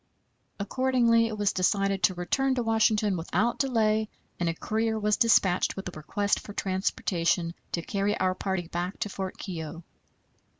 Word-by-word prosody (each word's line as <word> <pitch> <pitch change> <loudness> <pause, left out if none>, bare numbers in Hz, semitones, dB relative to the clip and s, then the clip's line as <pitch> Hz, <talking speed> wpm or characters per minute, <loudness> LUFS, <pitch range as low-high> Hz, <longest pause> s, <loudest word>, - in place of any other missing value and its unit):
Accordingly, 235 +1 +2
it 220 -1 -5
was 205 -1 +1
decided 195 +1 +1
to 185 - +3
return 265 +10 0
to 245 - 0
Washington 220 -2 +2
without 190 +7 0
delay, 220 -5 +1 0.3
and 175 -1 +1
a 165 - -2
courier 220 +4 -1
was 210 0 +2
dispatched 195 -6 +3
with 195 - -6
a - - -12
request 200 +7 -1
for 205 - -10
transportation 180 -3 0 0.2
to 170 - -1
carry 200 +2 -1
our 185 0 +2
party 190 -2 -3
back 175 +3 -3
to 210 - -1
Fort 190 -1 -5
Keogh. 165 -2 -6
200 Hz, 160 wpm, -27 LUFS, 180-220 Hz, 0.3 s, to